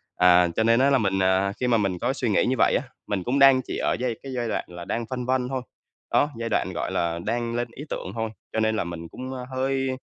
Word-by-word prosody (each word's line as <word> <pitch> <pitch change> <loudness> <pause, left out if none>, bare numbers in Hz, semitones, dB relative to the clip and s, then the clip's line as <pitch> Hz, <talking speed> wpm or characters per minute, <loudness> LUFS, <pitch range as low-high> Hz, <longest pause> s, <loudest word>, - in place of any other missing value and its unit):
À, 90 -1 +6
cho 110 - +2
nên 115 +1 +4
á 135 +2 +4
là 140 - +4
mình, 95 -5 +1
à, 95 +1 +2
khi 125 - 0
mà 120 -2 +4
mình 100 -4 0
có 125 +3 +1
suy 130 -3 -1
nghĩ 105 - +3
như 130 - +1
vậy - - +4
á, - - +1 0.2
mình 100 -3 -1
cũng 130 +6 0
đang 135 -1 +7
chỉ - - -4
ở - - +1
giai 125 -2 -1
cái 135 - -6
giai 120 -1 -1
đoạn - - -1
là 85 0 -9
đang 115 0 -2
phân 125 -1 -3
vân 130 0 0
thôi. 130 -1 -2 0.5
Đó, 145 - +3
giai 115 0 -2
đoạn, - - 0
gọi - - -3
là, 85 0 -1
đang 115 +1 -1
lên 120 0 -1
ý 145 - -7
tưởng 95 - -4
thôi, 110 0 -2 0.2
cho - - 0
nên 110 0 +2
là - - 0
mình 85 -1 -6
cũng, 130 +1 -6
a, 130 - -5
hơi 135 0 0
115 Hz, 280 wpm, -25 LUFS, 100-130 Hz, 0.5 s, đang